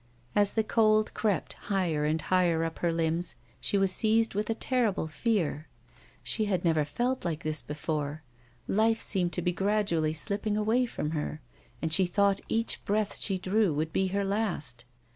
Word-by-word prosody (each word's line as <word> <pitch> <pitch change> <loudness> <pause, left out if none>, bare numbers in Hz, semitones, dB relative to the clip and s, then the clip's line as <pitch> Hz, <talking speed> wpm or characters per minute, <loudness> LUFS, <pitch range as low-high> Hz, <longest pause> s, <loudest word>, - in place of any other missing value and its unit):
As 205 -1 +3
the 220 - +2
cold 215 -1 +3
crept 210 -4 -1 0.2
higher 175 -7 +1
and 155 +2 +1
higher 170 0 +2
up 165 0 -4
her 170 - +1
limbs, 165 0 -1 0.2
she 200 - +1
was 195 -1 +3
seized 225 +3 +2
with 210 +2 -2
a 225 - +1
terrible 235 -8 0
fear. 160 -3 -1 0.6
She 215 - +1
had 185 -4 -1
never 160 -2 +3
felt 245 - -2
like 170 -2 -3
this 155 -1 -2
before; 150 0 -4 0.4
life 225 +2 +2
seemed 180 -4 +2
to 175 - -2
be 180 - +1
gradiially 190 -5 +1
slipping 205 +6 0
away 225 +4 +2
from 150 -9 -3
her, 155 -1 -3 0.4
and 160 -1 0
she 185 +1 +5
thought 200 +2 +2
each 230 +1 -1
breath 210 0 0
she 195 -2 0
drew 190 -2 +1
would 155 +2 -2
be 190 - +2
her 200 +1 -1
last. 185 - -2
190 Hz, 175 wpm, -29 LUFS, 160-215 Hz, 0.6 s, she